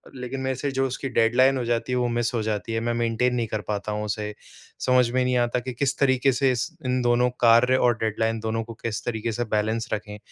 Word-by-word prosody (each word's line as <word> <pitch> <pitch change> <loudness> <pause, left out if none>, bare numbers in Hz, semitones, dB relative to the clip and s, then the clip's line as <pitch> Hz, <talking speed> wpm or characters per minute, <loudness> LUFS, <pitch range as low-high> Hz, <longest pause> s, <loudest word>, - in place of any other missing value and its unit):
लेकिन 125 +1 -5
मेरे 130 0 -1
से 140 +3 -2
जो 135 0 0
उसकी 135 +1 -4
डेडलाइन 125 +3 +3
हो 125 - -2
जाती 120 +1 -1
है, 125 - +1
वो 125 -1 +1
मिस 120 0 -1
हो 115 - 0
जाती 110 +1 -3
है, 115 - 0
मैं 120 +1 -1
मेंटेन 120 +1 +1
नहीं 120 -2 -1
कर 110 0 -3
पाता 105 0 -3
हूँ 105 0 -2
उसे। 105 0 -3 0.5
समझ 125 -2 +4
में 130 +1 +1
नहीं 125 0 +1
आता 120 0 +1
कि 125 +1 -6
किस 140 +3 -1
तरीके 135 -1 +3
से 130 +1 +2
इस 125 +4 -1 0.2
इन 125 0 +1
दोनों 120 0 +3
कार्य 120 +2 +5
और 120 -3 +2
डेडलाइन, 110 +1 -1
दोनों 110 +1 -2
को 115 +1 -9
किस 115 -2 -3
तरीके 115 -1 -2
से 120 +2 -2
बैलेंस 110 +2 -1
रखें? 105 -1 -5
120 Hz, 245 wpm, -24 LUFS, 115-125 Hz, 0.5 s, कार्य